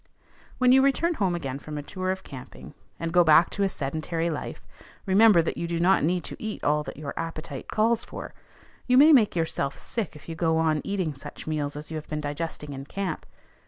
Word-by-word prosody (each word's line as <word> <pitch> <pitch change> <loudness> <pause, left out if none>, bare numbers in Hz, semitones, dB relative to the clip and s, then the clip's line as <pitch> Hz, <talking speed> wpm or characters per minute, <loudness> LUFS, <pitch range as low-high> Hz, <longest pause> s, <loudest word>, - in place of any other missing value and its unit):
When 250 -1 +4
you 265 +1 +7
return 275 +5 +2
home 190 - 0
again 135 -5 -4
from 150 +1 -7
a 145 - -5
tour 185 +4 -4
of 190 0 -2
camping, 130 -2 -11 0.3
and 165 0 -3
go 175 -1 +6
back 160 +1 +5
to 200 - -4
a 195 - +3
sedentary 165 +2 -2
life, 150 - -6 0.4
remember 200 -2 +6
that - - -3
you 170 - -2
do 170 0 -2
not 185 0 +4
need 175 +3 +1
to - - -6
eat 220 -1 -5
all 150 +1 +2
that - - -7
your 145 -1 -5
appetite 155 -4 -5
calls 225 +2 +1
for. - - -8 0.5
You 250 0 +4
may 305 +4 +8
make 225 -9 +5
yourself 160 -4 -1
sick 220 -10 -4
if 150 - -14
you 165 - -4
go 160 0 +1
on 160 -2 +2
eating 185 -6 -2
such 135 - -10
meals 150 -2 -2
as 150 +2 -7
you 160 - -3
have 155 - -8
been 150 - -3
digesting 150 0 -4
in 135 0 -7
camp. 185 0 -4
165 Hz, 220 wpm, -26 LUFS, 150-195 Hz, 0.5 s, may